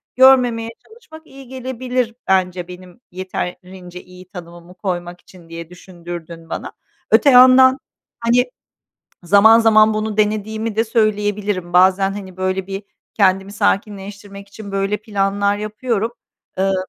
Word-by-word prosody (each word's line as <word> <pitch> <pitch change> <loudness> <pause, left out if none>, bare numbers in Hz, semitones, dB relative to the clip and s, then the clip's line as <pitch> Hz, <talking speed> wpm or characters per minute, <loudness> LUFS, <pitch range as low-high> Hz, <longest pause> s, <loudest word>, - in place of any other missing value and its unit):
görmemeye 250 -3 +4 0.2
çalışmak 445 -9 -16
iyi 270 -1 -14
gelebilir 255 -2 -3
bence 180 -2 0
benim 180 +2 -13
yeterince 180 0 -7
iyi 180 0 -15
tanımımı 175 -1 -12
koymak 175 -2 -5
için 175 -3 -18
diye 165 0 -9
düşündürdün 175 -2 -10
bana. - - -6 0.4
Öte 285 - +5
yandan, 260 0 +7 0.4
hani, 240 +1 +2 0.8
zaman 205 +5 +6
zaman 220 -1 +4
bunu 215 0 -3
denediğimi 215 +1 -1
de 225 - +2
söyleyebilirim. 205 -4 -1
Bazen, 190 +2 +4
hani, 190 -3 -9
böyle 185 0 -2
bir, 195 +1 -6 0.3
kendimi 195 -1 +1
sakinleştirmek 200 -1 -3
için 200 0 -11
böyle 195 +1 -1
planlar 200 -1 -1
yapıyorum. 215 +1 -3 0.5
Iıı, 195 0 +1
200 Hz, 120 wpm, -18 LUFS, 185-225 Hz, 0.8 s, yandan